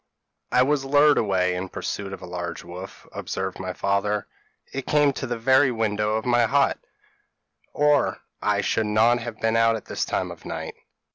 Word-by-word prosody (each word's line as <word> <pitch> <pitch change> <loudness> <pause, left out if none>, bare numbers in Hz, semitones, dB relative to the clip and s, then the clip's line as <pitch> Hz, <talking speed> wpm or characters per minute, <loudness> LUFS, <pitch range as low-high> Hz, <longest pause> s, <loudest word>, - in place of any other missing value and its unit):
p> - - +1
"'I 125 - +7
was 140 0 +1
lured 145 +2 +5
away 95 -3 +1
in 90 +1 -4
pursuit 100 +1 -4
of 95 - -8
a - - -5
large 90 -1 -5
white - - -12
wolf,' 95 +2 -10
observed 95 -1 -4
my 95 -1 -4
father; 100 +2 0 0.5
'it 135 -1 -4
came 145 -2 +3
to 130 - -4
the 120 0 -2
very 130 +4 +4
window 105 -2 0
of 110 - -2
my 120 -1 +3
hut, 140 +3 +2 0.9
or 150 -1 +2 0.2
I - - +1
should 110 -1 0
not 110 +3 +3
have 115 -2 -7
been 115 0 +1
out 115 0 +4
at 110 - -7
this - - -2
time - - -2
of - - -11
night.' - - -5
110 Hz, 195 wpm, -24 LUFS, 100-130 Hz, 0.9 s, I